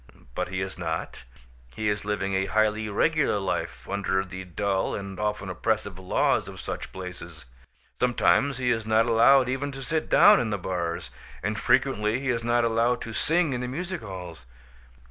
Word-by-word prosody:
But - - -2
he 95 +1 -3
is 95 -1 -5
not; 80 -6 -4 0.5
he 110 - -2
is 105 0 0
living 100 -2 -2
a 95 0 +1
highly 110 +2 +1
regular 145 +3 +2
life, 65 -10 -3
under 95 -1 -1
the 95 0 -7
dull, 95 +2 -1
and 100 -1 -6
often 105 -2 -2
oppressive, 100 +1 -2
laws 95 - +1
of - - -9
such - - -5
places. 90 -3 -9 0.5
Some 125 -1 +1
times 140 -2 +3
he 125 -1 +1
is 115 -2 -1
not 110 +1 +4
allowed 120 +3 +5
even 135 +3 -2
to 135 0 -7
sit 155 +3 -2
down - - +7
in 115 -2 -1
the 105 - -1
bars; 85 -2 -3 0.3
and 105 +2 -1
frequently 120 -2 +2
he 135 -1 -3
is 115 -1 -2
not 120 0 +2
allowed 115 +2 +2
to 115 - -7
sing 160 +4 +1
in 125 - -2
the 125 - -3
music 175 +7 -4
halls. 90 - -9
105 Hz, 185 wpm, -26 LUFS, 95-125 Hz, 0.5 s, down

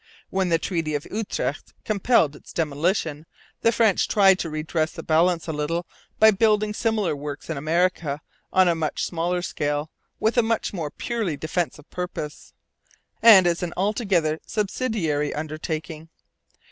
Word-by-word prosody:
When 190 -1 0
the 165 - +4
Treaty 165 -3 -2
of 145 - -3
Utrecht 215 0 -3
compelled 200 - +2
its - - -14
demolition, 160 0 -1 0.3
the 230 - +4
French 220 -4 +3
tried 195 -2 +5
to 165 - -3
redress 155 +1 -2
the - - -8
balance 165 +1 +2
a 160 - -2
little 160 +4 -2 0.3
by 220 0 +7
building 210 0 +2
similar 215 -7 0
works 145 +2 -6
in - - -2
America 155 0 0 0.3
on 185 -1 +5
a - - +5
very 165 - -5
much 155 -2 -1
smaller 175 +1 -1
scale, 145 -2 -2 0.3
with 220 +3 +2
a - - +7
much 225 -1 -1
more 165 -6 -3
purely 215 -5 -3
defensive 155 -1 -3
purpose, 175 -4 -6 0.7
and 215 -5 +9
as 170 -1 +1
an 175 -1 -3
altogether 190 -6 +1
subsidiary 200 - -1
undertaking. 155 +1 -5
170 Hz, 150 wpm, -24 LUFS, 155-200 Hz, 0.7 s, and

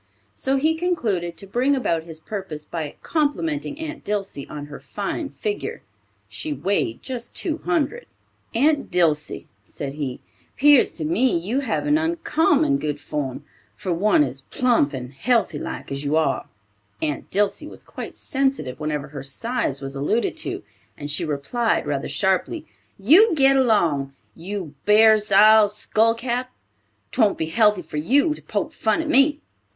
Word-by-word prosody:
So 265 - 0
he 310 +4 +2
concluded 235 - -1
to 200 - -7
bring 250 +8 +1
about 165 -11 -1
his 160 -2 -6
purpose 165 -6 -6
by 155 -4 -5
complimenting 295 -1 -1
Aunt 315 -1 -6
Dilsey 200 -9 -4
on 145 -1 -6
her 145 -1 -10
fine 205 - -4
figure 210 -5 -4 0.4
(she 105 +9 -5
weighed 145 - -1
just 250 -3 -6
two 325 -2 -2
hundred!). 345 +9 -1 0.5
"Aunt 285 +4 +2
Dilsey," 160 -4 +1 0.2
said 140 +5 -6
he, 140 -4 -4 0.4
"'pears 290 -1 +6
to 155 - -3
me 185 +7 +2
you 205 +11 -1
have 255 -6 -1
an 295 +1 +3
uncommon 315 -3 +2
good 150 -1 -3
form, 140 -4 -4 0.3
for 190 -4 -2
one 190 -2 +3
as 135 -1 -4
plump 235 - +1
and 130 -2 -7
healthy 220 - +1
like - - -6
as 140 +1 -4
you 145 +2 0
are." 160 0 +1 0.5
Aunt 150 -2 -3
Dilsey 205 +9 +1
was - - -11
quite - - -8
sensitive 270 - -1
whenever 150 -2 -3
her 140 -1 -7
size 140 - -2
was 135 0 -5
alluded 150 +12 0
to, - - -3 0.3
and 145 0 -4
she 165 +4 +1
replied 160 - 0
rather 145 -1 -2
sharply: 190 - 0 0.3
"You 330 - +6
git 275 -2 +5
along, 170 - +2 0.2
you 180 -2 -6
bar's 215 0 +5
ile 215 +1 +7
skullcap. 230 +4 0 0.6
'Twon't 215 -5 +2
be 160 - -1
healthy 210 +2 +3
for 155 -1 -7
you 280 - +3
to - - -12
poke - - -3
fun - - +1
at - - -6
me." 295 0 +4
205 Hz, 155 wpm, -23 LUFS, -, 0.6 s, ile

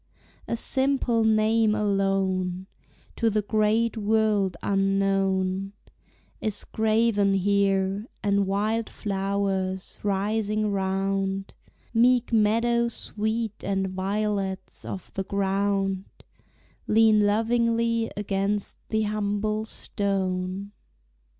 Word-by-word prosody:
A - - -1
simple 260 -2 +1
name 220 0 +3
alone, 195 -3 0 0.5
To 230 - +2
the 215 -1 0
great 215 +3 +1
world 210 -4 +1
unknown, 195 -1 +1 0.7
Is 215 -2 -2
graven 220 -2 +2
here, 195 +1 +1 0.2
and 200 -1 +2
wild 215 +3 0
flowers, 195 -2 -2
rising 210 +1 0
round, 195 0 -1 0.4
Meek 240 +1 +3
meadow 230 +2 +3
sweet 220 -1 -3
and 195 -1 -1
violets 195 0 -2
of 190 - -7
the 195 - -2
ground, 195 0 0 0.8
Lean 220 0 +5
lovingly 230 +2 +1
against 200 0 -2
the 220 0 +1
humble 215 +1 -1
stone. 195 -2 -2
205 Hz, 85 wpm, -26 LUFS, 195-220 Hz, 0.8 s, Lean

